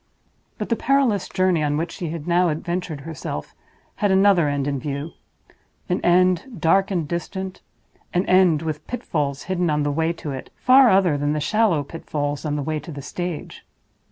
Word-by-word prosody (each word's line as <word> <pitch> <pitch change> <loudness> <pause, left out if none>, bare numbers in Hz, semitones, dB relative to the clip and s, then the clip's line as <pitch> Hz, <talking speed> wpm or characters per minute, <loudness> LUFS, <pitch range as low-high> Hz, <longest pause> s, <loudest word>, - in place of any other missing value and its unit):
But - - -4
the 230 - +2
perilous 260 -7 +1
journey 185 -3 +2
on 145 0 0
which 165 +3 -2
she 170 - -5
had 160 -1 -6
now 175 0 +3
adventured 165 -1 -3
herself 140 - -6 0.4
had 205 - +1
another 190 -5 +4
end 140 -1 -1
in 140 -2 -1
view—an 150 +5 -7
end, 180 +6 +2
dark 190 +5 +3
and 175 -6 -1
distant—an 185 +1 -5
end, 180 -4 +4
with 155 -1 -4
pitfalls 145 - -2
hidden 180 -2 -1
on 150 -1 +1
the 145 - 0
way 160 +3 +1
to 155 -3 -6
it, 130 -1 -7
far 255 0 +6
other 185 -7 +3
than 145 +1 0
the 150 - -1
shallow 190 -1 +2
pitfalls 145 -1 -4
on 150 -1 -1
the 145 - -2
way 155 +2 -2
to 165 - -9
the 140 -2 -7
stage. 175 +1 -5
165 Hz, 175 wpm, -22 LUFS, 150-185 Hz, 0.4 s, far